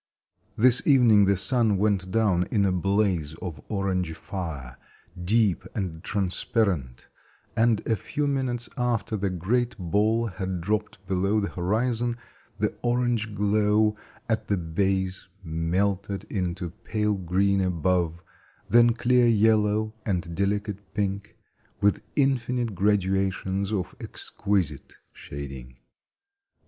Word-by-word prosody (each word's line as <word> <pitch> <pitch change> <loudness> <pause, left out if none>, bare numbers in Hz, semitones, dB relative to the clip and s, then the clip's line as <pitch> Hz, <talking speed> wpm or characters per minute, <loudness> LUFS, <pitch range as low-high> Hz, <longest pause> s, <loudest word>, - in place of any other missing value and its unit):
This 125 +2 +7
evening 120 -8 +6
the 100 0 +3
sun 110 0 +2
went 100 -2 +1
down 95 -4 +2
in 100 -3 +2
a 95 - +2
blaze 90 -4 0
of 80 -4 -7
orange 95 -5 -1
fire, 80 -9 -6 0.4
deep 100 -1 +2
and 90 -6 -4
transparent, 95 - -1 0.5
and 115 -1 +2
a 115 - +2
few 145 +8 -3
minutes 130 -4 -1
after 120 -3 -1
the 100 -1 -1
great 115 +8 -1
ball 105 +6 +1
had 95 -3 -4
dropped 105 +2 -3
below 95 +3 +1
the 100 - -2
horizon, 115 +6 0 0.4
the - - -1
orange 120 -3 0
glow 105 +1 +2 0.3
at 110 -1 -1
the 100 - +1
base 95 +3 -1 0.2
melted 95 +4 -1
into 90 -3 -2
pale 105 -1 0
green 95 +2 +1
above, 85 -1 0 0.4
then 120 0 +5
clear 120 0 +3
yellow 110 -1 +3
and 90 -4 -2
delicate 100 0 -2
pink, 100 -1 -3 0.4
with 100 0 +2
infinite 125 -4 +1
graduations 95 0 0
of 95 -3 -2
exquisite 90 -9 -2 0.2
shading. 65 -3 -9
100 Hz, 115 wpm, -26 LUFS, 90-110 Hz, 0.5 s, This